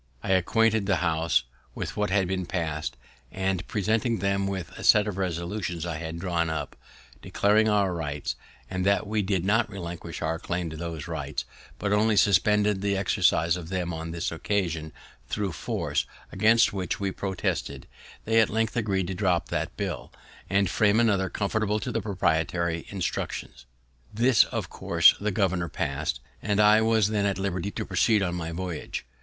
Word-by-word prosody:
I -, -, -1 dB
acquainted 110 Hz, +3 st, +3 dB
the 100 Hz, -, +3 dB
House 80 Hz, -6 st, +2 dB, 0.3 s
with -, -, -4 dB
what 105 Hz, 0 st, 0 dB
had 95 Hz, -1 st, +2 dB, 0.2 s
pass'd, 80 Hz, -4 st, -2 dB, 0.3 s
and, 95 Hz, -1 st, -2 dB
presenting 110 Hz, +3 st, 0 dB
them 100 Hz, -1 st, 0 dB
with 95 Hz, -3 st, -4 dB
a -, -, -10 dB
set 105 Hz, -, +6 dB
of 105 Hz, -, -3 dB
resolutions 85 Hz, -1 st, -3 dB
I 85 Hz, -3 st, -3 dB
had 80 Hz, 0 st, -5 dB
drawn 85 Hz, -2 st, -1 dB
up, 80 Hz, -2 st, -4 dB, 0.5 s
declaring 110 Hz, +2 st, +2 dB
our 100 Hz, -3 st, +2 dB
rights, 75 Hz, -4 st, -3 dB, 0.3 s
and 90 Hz, -1 st, -3 dB
that 100 Hz, +2 st, +2 dB
we 105 Hz, +1 st, 0 dB
did 95 Hz, -2 st, -1 dB
not 110 Hz, +2 st, +2 dB
relinquish 85 Hz, -4 st, -6 dB
our 80 Hz, 0 st, -1 dB
claim 85 Hz, -2 st, -3 dB
to -, -, -7 dB
those 80 Hz, -2 st, -5 dB
rights, -, -, -4 dB, 0.3 s
but 100 Hz, 0 st, -1 dB
only 105 Hz, 0 st, +3 dB
suspended 105 Hz, 0 st, +3 dB
the 100 Hz, -1 st, 0 dB
exercise 90 Hz, -4 st, +2 dB
of 85 Hz, -2 st, -7 dB
them 90 Hz, -2 st, -2 dB
on 80 Hz, 0 st, -5 dB
this 85 Hz, +1 st, -3 dB
occasion 85 Hz, -3 st, -2 dB, 0.4 s
thro' 100 Hz, -3 st, -1 dB
force, 75 Hz, -, -2 dB, 0.2 s
against 115 Hz, +1 st, +4 dB
which 95 Hz, -2 st, -2 dB
we 100 Hz, -1 st, -1 dB
protested, 95 Hz, -2 st, -3 dB, 0.4 s
they 115 Hz, +1 st, +4 dB
at 110 Hz, -, +4 dB
length 110 Hz, -1 st, 0 dB
agreed 100 Hz, -5 st, 0 dB
to 95 Hz, -, -3 dB
drop 90 Hz, -2 st, 0 dB
that 80 Hz, -1 st, -3 dB
bill, 90 Hz, -, -4 dB, 0.4 s
and 100 Hz, 0 st, +3 dB
frame 105 Hz, +3 st, +3 dB
another 100 Hz, -5 st, +2 dB
conformable 105 Hz, +2 st, 0 dB
to 125 Hz, -, -4 dB
the 115 Hz, 0 st, -1 dB
proprietary 85 Hz, -3 st, 0 dB
instructions. 85 Hz, -8 st, -4 dB, 0.4 s
This 120 Hz, +2 st, +4 dB
of -, -, -4 dB
course -, -, +4 dB
the 105 Hz, -, -1 dB
governor 95 Hz, -4 st, 0 dB
pass'd, 70 Hz, +2 st, -2 dB, 0.2 s
and 105 Hz, -1 st, 0 dB
I 105 Hz, +1 st, +6 dB
was 110 Hz, -2 st, +3 dB
then 105 Hz, -2 st, +1 dB
at 100 Hz, -2 st, -1 dB
liberty 95 Hz, -1 st, -2 dB
to -, -, -4 dB
proceed 100 Hz, +3 st, +2 dB
on 90 Hz, -2 st, -1 dB
my 85 Hz, -2 st, -4 dB
voyage. 85 Hz, -6 st, -5 dB
95 Hz, 170 wpm, -27 LUFS, 85-105 Hz, 0.5 s, set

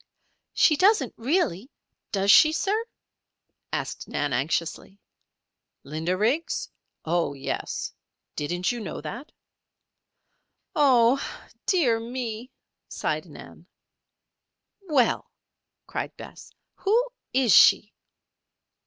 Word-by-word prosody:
"She 305 Hz, -, +5 dB
doesn't, 375 Hz, -, +3 dB
really, 250 Hz, -, -1 dB, 0.4 s
does 200 Hz, 0 st, +3 dB
she, 310 Hz, +8 st, +7 dB
sir?" 425 Hz, +7 st, 0 dB, 0.9 s
asked -, -, -4 dB
Nan, 145 Hz, -2 st, -2 dB
anxiously. 165 Hz, +8 st, -2 dB, 0.8 s
"Linda 160 Hz, +5 st, -2 dB
Riggs? 250 Hz, -, -1 dB, 0.3 s
Oh, 165 Hz, -3 st, 0 dB
yes. 135 Hz, -, -4 dB, 0.4 s
Didn't 175 Hz, +6 st, -1 dB
you 240 Hz, -, -4 dB
know 210 Hz, -, -6 dB
that?" 240 Hz, -, -8 dB, 1.4 s
"Oh, 265 Hz, -3 st, +4 dB, 0.4 s
dear, 270 Hz, -, +3 dB
me," 235 Hz, 0 st, -5 dB, 0.4 s
sighed -, -, -3 dB
Nan. -, -, -13 dB, 1.2 s
"Well!" 260 Hz, -6 st, +2 dB, 0.6 s
cried -, -, -5 dB
Bess. -, -, -12 dB, 0.3 s
"Who 465 Hz, +5 st, +1 dB, 0.2 s
is 250 Hz, -5 st, +3 dB
she?" 205 Hz, +1 st, +6 dB
230 Hz, 90 wpm, -25 LUFS, 180-290 Hz, 1.4 s, she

